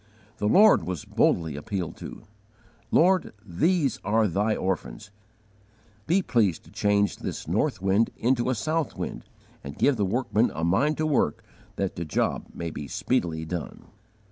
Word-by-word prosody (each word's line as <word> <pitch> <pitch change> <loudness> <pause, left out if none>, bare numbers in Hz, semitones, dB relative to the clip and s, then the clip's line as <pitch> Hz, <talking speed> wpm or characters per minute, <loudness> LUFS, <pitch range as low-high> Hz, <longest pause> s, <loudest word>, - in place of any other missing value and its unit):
The 105 - 0
Lord 210 - +6
was 90 -5 -4
boldly 80 -4 +1
appealed 90 +3 -4
to. - - -9 0.7
"Lord, 185 +2 +3
these 145 - +1
are 110 +2 +2
Thy 105 +4 0
orphans: 95 +2 -3 1.0
be 185 +4 +3
pleased 105 - +1
to - - -18
change 100 0 +1
this - - -6
north - - 0
wind 100 +4 +3
into 125 +1 +1
a 130 - +1
south 155 +6 -2
wind, - - -5 0.4
and 70 +1 -8
give 140 -3 +3
the 105 - +1
workmen 115 +2 +1
a 80 - -3
mind 120 - +2
to 155 - 0
work 140 - +1 0.3
that 95 -2 -3
the 85 - -2
job 75 - -1
may 85 -1 -5
be 70 - -6
speedily 80 +3 -1
done." 85 0 -6
105 Hz, 155 wpm, -26 LUFS, 85-130 Hz, 1.0 s, Lord